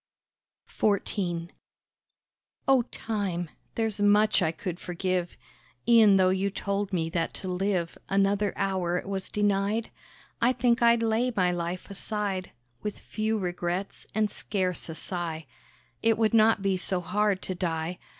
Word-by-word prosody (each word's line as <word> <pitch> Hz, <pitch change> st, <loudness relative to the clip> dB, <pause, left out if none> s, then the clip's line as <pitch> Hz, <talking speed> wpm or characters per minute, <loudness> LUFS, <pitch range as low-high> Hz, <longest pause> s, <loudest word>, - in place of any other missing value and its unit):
XIV 185 Hz, -4 st, -1 dB, 1.2 s
Oh, 270 Hz, -2 st, +6 dB
Time! 190 Hz, -7 st, -3 dB, 0.2 s
There's 220 Hz, -3 st, -1 dB
much 205 Hz, 0 st, +4 dB
I 160 Hz, -3 st, +2 dB
could 175 Hz, +1 st, -5 dB
forgive; 180 Hz, 0 st, -2 dB, 0.5 s
E'en 220 Hz, -4 st, +7 dB
though 185 Hz, -1 st, +5 dB
you 190 Hz, +1 st, +1 dB
told 200 Hz, 0 st, -2 dB
me 165 Hz, -4 st, 0 dB
that 165 Hz, -2 st, -1 dB
to 190 Hz, -, -4 dB
live 180 Hz, -2 st, -1 dB
Another 200 Hz, +1 st, +2 dB
hour 185 Hz, -3 st, 0 dB
it -, -, -5 dB
was 195 Hz, -1 st, -3 dB
denied, 205 Hz, +2 st, 0 dB, 0.5 s
I 240 Hz, +2 st, +4 dB
think 245 Hz, -1 st, +2 dB
I'd 235 Hz, -1 st, +5 dB
lay 230 Hz, +3 st, +2 dB
my 180 Hz, -2 st, +3 dB
life 175 Hz, +1 st, -3 dB
aside 200 Hz, -2 st, -3 dB, 0.3 s
With 210 Hz, -1 st, -4 dB
few 220 Hz, 0 st, -2 dB
regrets, 180 Hz, 0 st, -3 dB
and 215 Hz, -2 st, +2 dB
scarce 185 Hz, -4 st, -2 dB
a 160 Hz, -, -5 dB
sigh, 165 Hz, -3 st, -4 dB, 0.6 s
It 225 Hz, -1 st, +3 dB
would 220 Hz, 0 st, +2 dB
not 220 Hz, -2 st, +5 dB
be 195 Hz, -1 st, +2 dB
so 185 Hz, 0 st, 0 dB
hard 205 Hz, +2 st, 0 dB
to 185 Hz, -, -2 dB
die. 170 Hz, -1 st, -2 dB
195 Hz, 140 wpm, -28 LUFS, 180-215 Hz, 1.2 s, E'en